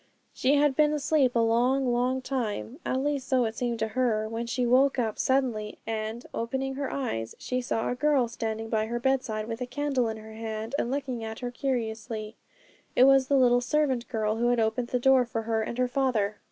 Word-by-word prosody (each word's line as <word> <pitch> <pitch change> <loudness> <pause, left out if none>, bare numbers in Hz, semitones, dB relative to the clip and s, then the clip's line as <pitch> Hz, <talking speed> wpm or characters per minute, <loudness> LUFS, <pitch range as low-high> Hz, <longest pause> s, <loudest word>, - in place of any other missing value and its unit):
She 270 +3 +2
had 290 -1 +3
been 300 +1 +3
asleep 285 -3 +2
a - - +4
long, 250 +4 +2
long 255 +2 0
time, 250 0 -3
at 260 +1 -1
least 285 -3 -1
so 255 -2 +2
it 220 0 -3
seemed 240 -2 -2
to 220 0 -1
her, 220 -2 0
when 230 +1 -4
she 250 +1 0
woke 265 +3 +4
up 225 -4 -1
suddenly, 245 -6 0
and, 220 +1 -4
opening 265 +3 -2
her 275 0 -3
eyes, 115 - -3
she 255 0 -2
saw 225 -2 -1
a - - 0
girl 275 -1 +2
standing 225 -1 -4
by 220 -1 0
her 240 +1 -2
bedside 240 -4 0
with 230 +1 -5
a 250 - -2
candle 265 -2 0
in 220 - -4
her 220 0 -11
hand, 220 +1 -5
and 235 - -1
looking 260 -4 -3
at 220 +1 -6
her 245 -1 -3
curiously. 225 -4 -3 0.6
It 250 - +6
was 270 0 +6
the 280 - +3
little 245 -1 +4
servant 265 -2 0
girl 220 -2 -1
who 240 +1 +1
had 245 -1 +2
opened 225 +2 0
the 250 - 0
door 265 0 +5
for 230 -2 -4
her 225 0 0
and 225 +2 -4
her 250 0 +2
father. 245 -6 0
245 Hz, 215 wpm, -27 LUFS, 225-265 Hz, 0.6 s, It